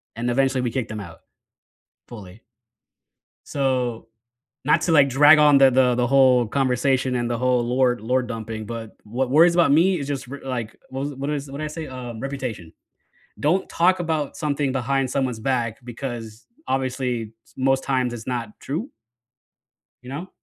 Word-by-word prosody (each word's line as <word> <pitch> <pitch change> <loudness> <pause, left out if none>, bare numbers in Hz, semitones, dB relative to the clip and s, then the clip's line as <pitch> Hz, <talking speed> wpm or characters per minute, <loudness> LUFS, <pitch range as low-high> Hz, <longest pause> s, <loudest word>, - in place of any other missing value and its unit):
and 120 +2 -2
eventually 135 0 +1
we 120 -2 -1
kicked 125 -1 -3
them 110 -1 -5
out. 85 -4 -11 0.9
Fully. 105 -2 -11 1.1
So, 125 -5 -1 0.6
not 150 - +3
to, 175 - 0
like, 145 -4 +5
drag 145 +4 +7
on 150 -2 +6
the 135 -1 +7
the 125 -1 +3
the 120 0 +1
whole 130 -2 +5
conversation 130 +1 +1
and 120 -1 -1
the 120 - -1
whole 125 -1 +1
lore 125 0 +2
lore-dumping, 115 -2 -3
but 115 0 -7
what 125 +4 -2
worries 170 +5 +5
about 170 -5 +4
me 170 +4 +4
is 140 - -5
just, 135 -4 -4
r 140 - -6
like 120 -4 -4
what 135 +2 -4
is - - -5
wh - - -13
what 140 +1 -3
is 145 -1 -4
what 140 - -6
did 155 - -3
I - - -2
say? 155 +1 -6 0.3
Reputation. 125 -10 -5 0.7
Don't 175 +6 +1
talk 180 +2 +2
about 160 -4 -2
something 145 -3 -1
behind 135 +1 0
someone's 125 -3 -1
back 120 -2 -1
because, 120 -2 -7 0.2
obviously, 125 -4 -2
s - - -24
most 135 0 +1
times, 130 -3 0
it's 115 -1 -8
not 120 -3 -3
true? 180 - -4 1.1
You 125 - -10
know? 160 +7 -6
130 Hz, 175 wpm, -23 LUFS, 120-140 Hz, 1.1 s, drag